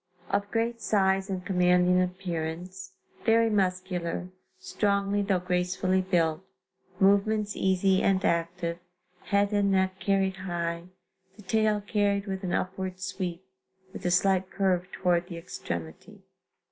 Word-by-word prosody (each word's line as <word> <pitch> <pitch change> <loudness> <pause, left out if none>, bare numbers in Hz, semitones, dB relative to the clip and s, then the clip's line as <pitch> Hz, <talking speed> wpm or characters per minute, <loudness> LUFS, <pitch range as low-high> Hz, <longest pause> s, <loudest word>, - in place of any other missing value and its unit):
Of 200 +1 0
great 230 +1 -1
size 195 -1 +2
and 185 -2 -4
commanding 180 0 +3
appearance, 180 +1 -4 0.3
very 225 0 +4
muscular, 185 -3 -1 0.3
strongly 200 0 0
though 195 -2 +1
gracefully 180 +1 0
built; 175 -2 +1 0.6
movements 205 +2 +3
easy 190 0 +2
and 190 -1 +2
active, 170 0 -1 0.5
head 200 0 +2
and 205 -1 +2
neck 190 0 +1
carried 195 0 +1
high; 170 -2 -3 0.5
the 210 - -14
tail 215 +1 +1
carried 205 -1 0
with 190 -1 -4
an 180 - -2
upward 185 0 -2
sweep, 185 -1 -4 0.5
with - - -8
a 180 - +1
slight 190 +1 +2
curve 185 -2 0
toward 175 -1 +1
the 170 - -7
extremity. 85 - -7
190 Hz, 125 wpm, -28 LUFS, 180-200 Hz, 0.6 s, very